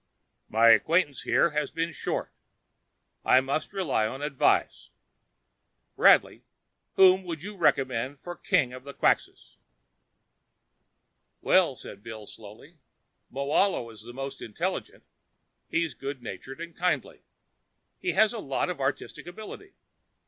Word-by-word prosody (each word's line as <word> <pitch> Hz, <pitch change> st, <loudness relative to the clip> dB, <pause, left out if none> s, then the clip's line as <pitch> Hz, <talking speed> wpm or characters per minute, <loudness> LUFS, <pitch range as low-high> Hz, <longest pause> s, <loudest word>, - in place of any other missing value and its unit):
"My 115 Hz, +2 st, +5 dB
acquaintance 150 Hz, +4 st, +3 dB
here 170 Hz, -, +2 dB
has 150 Hz, -1 st, -1 dB
been 165 Hz, +1 st, -2 dB
short. -, -, -4 dB, 0.9 s
I 130 Hz, -, +6 dB
must 135 Hz, +4 st, -2 dB
rely 165 Hz, -, 0 dB
on 135 Hz, +6 st, -6 dB
advice. 145 Hz, -3 st, +1 dB, 1.1 s
Bradley, -, -, +5 dB, 0.5 s
whom 190 Hz, 0 st, +6 dB
would 165 Hz, -3 st, -5 dB
you 210 Hz, +1 st, -7 dB
recommend 135 Hz, -6 st, +1 dB
as 175 Hz, 0 st, -6 dB
king 125 Hz, -2 st, +2 dB
of 130 Hz, 0 st, -9 dB
the 140 Hz, 0 st, -10 dB
Quxas?" -, -, 0 dB, 1.8 s
"Well," -, -, +3 dB
said 100 Hz, -, -11 dB
Bill 110 Hz, -1 st, -9 dB
slowly, 110 Hz, +12 st, -13 dB, 0.5 s
"Moahlo 140 Hz, -1 st, 0 dB
is 110 Hz, -, -12 dB
the 120 Hz, +2 st, -10 dB
most 135 Hz, +2 st, -6 dB
intelligent. 105 Hz, -, -4 dB, 0.7 s
He's 165 Hz, -3 st, 0 dB
good 135 Hz, -1 st, -6 dB
natured 135 Hz, +4 st, -8 dB
and 170 Hz, -1 st, -8 dB
kindly. 180 Hz, 0 st, -1 dB, 0.8 s
He 370 Hz, -, -1 dB
has 220 Hz, +1 st, +4 dB
a 230 Hz, -, -5 dB
lot 140 Hz, +1 st, -1 dB
of 175 Hz, -, -7 dB
artistic 135 Hz, +5 st, -3 dB
ability. 220 Hz, -, -10 dB
140 Hz, 125 wpm, -27 LUFS, 130-175 Hz, 1.8 s, I